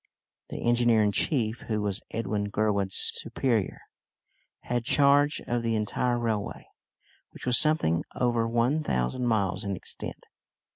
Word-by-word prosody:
The - - -4
engineer 120 -2 +4
in 105 - +2
chief, 115 -1 0
who 110 -2 -1
was 100 -2 -2
Edwin 105 -2 -2
Gurwood's 100 -2 +1
superior, 115 -7 -1 0.8
had 120 -1 -2
charge 145 +3 +3
of 120 0 -1
the 115 -1 0
entire 120 +3 0
railway, 110 -4 -3 0.6
which - - -11
was 125 -1 +4
something 150 - +2
over 120 -2 +1
one 120 +6 +1
thousand 120 - -1
miles 100 -3 0
in 100 -1 -2
extent. - - -6
115 Hz, 135 wpm, -27 LUFS, 105-120 Hz, 0.8 s, engineer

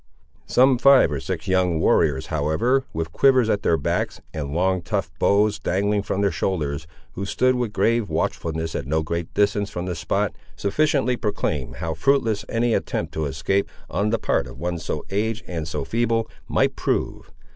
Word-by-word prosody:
Some 130 0 +4
five 135 - +6
or 75 - -2
six 65 - -5
young 90 -3 +2
warriors, 75 -4 +2
however, 110 - +1
with 80 0 -3
quivers 130 +1 +4
at 100 - 0
their 85 - +2
backs, 70 - -1
and 75 -3 -4
long 95 +3 +1
tough 90 0 -2
bows 105 +1 +3
dangling 100 +5 0
from 100 0 -2
their 100 -1 +2
shoulders, 80 -3 -2 0.2
who 100 - -5
stood 130 +6 +2
with 120 -4 -1
grave 115 0 +1
watchfulness 80 0 -2
at 70 - -4
no 80 +2 +1
great 85 +1 -3
distance 105 0 +2
from 90 0 -4
the 90 - -2
spot, 90 +5 -1 0.2
sufficiently 130 +3 +1
proclaimed 105 -3 -2
how 80 0 -3
fruitless 110 - +1
any 115 0 +1
attempt - - -2
to 80 - -2
escape, 70 +9 0 0.2
on 105 +1 0
the 115 - +1
part 60 - 0
of - - -11
one 85 +3 -3
so - - -4
aged 110 +4 -1
and 80 -3 -4
so 75 -3 -3
feeble, 115 +2 0 0.2
might - - +1
prove. - - -2
95 Hz, 180 wpm, -23 LUFS, 80-115 Hz, 0.2 s, five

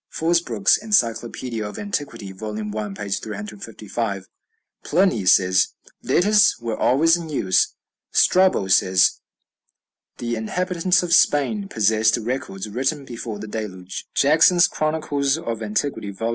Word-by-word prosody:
(Fosbroke's 160 - +1
"Encyclopædia 120 - -1
of - - -10
Antiquity," 140 - -5
vol. 105 +2 -7
i., 110 - -4 0.3
p. 100 0 -6
355.) 105 0 -5 0.6
Pliny 160 - +1
says, 95 0 +3 0.3
"Letters 210 +2 +3
were 115 -2 -3
always 160 +9 +3
in 170 -2 -6
use." 95 -11 +1 0.4
Strabo 185 - +3
says, 95 0 +3 1.0
"The 120 -1 -3
inhabitants 180 - 0
of 170 -1 -1
Spain 180 +8 +2
possessed 110 - +2
records 110 -4 -4
written 135 +6 -2
before 115 -3 -7
the 105 +1 -8
Deluge." 95 -4 -7
(Jackson's 165 +5 +5
"Chronicles 155 -2 -1
of 115 -9 -5
Antiquity," 110 +1 -2
vol. 105 +4 -4
115 Hz, 115 wpm, -22 LUFS, 105-160 Hz, 1.0 s, Jackson's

